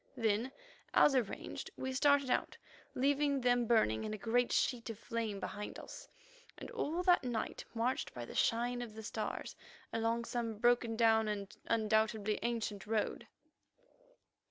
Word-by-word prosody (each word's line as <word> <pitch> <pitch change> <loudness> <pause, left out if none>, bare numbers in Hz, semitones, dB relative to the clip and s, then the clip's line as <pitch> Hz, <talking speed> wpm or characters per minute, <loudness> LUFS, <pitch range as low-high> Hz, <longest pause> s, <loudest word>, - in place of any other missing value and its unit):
Then, 225 +2 +1 0.4
as 290 - +6
arranged, 245 -6 -2
we 260 0 -3
started 280 0 +3
out, - - 0 0.4
leaving 280 +1 +2
them 245 -1 +3
burning 110 - +3
in 215 0 -3
a - - -7
great 240 +4 +1
sheet 240 -2 +1
of 225 - -5
flame 225 -3 -3
behind 205 +1 -5
us, - - -10 0.5
and - - -8
all 335 +5 -2
that 355 -4 +5
night 240 -3 -3
marched 240 +3 0
by 120 -1 -5
the - - -10
shine 245 +2 +1
of 225 -3 -7
the 220 - -8
stars - - -4 0.4
along 230 +1 0
some 230 -3 -3
broken 240 0 +3
down 220 -1 +4
and 200 -2 -4
undoubtedly 220 -1 +1
ancient 220 -3 -2
road. 220 -1 -1
230 Hz, 150 wpm, -35 LUFS, 220-245 Hz, 0.5 s, as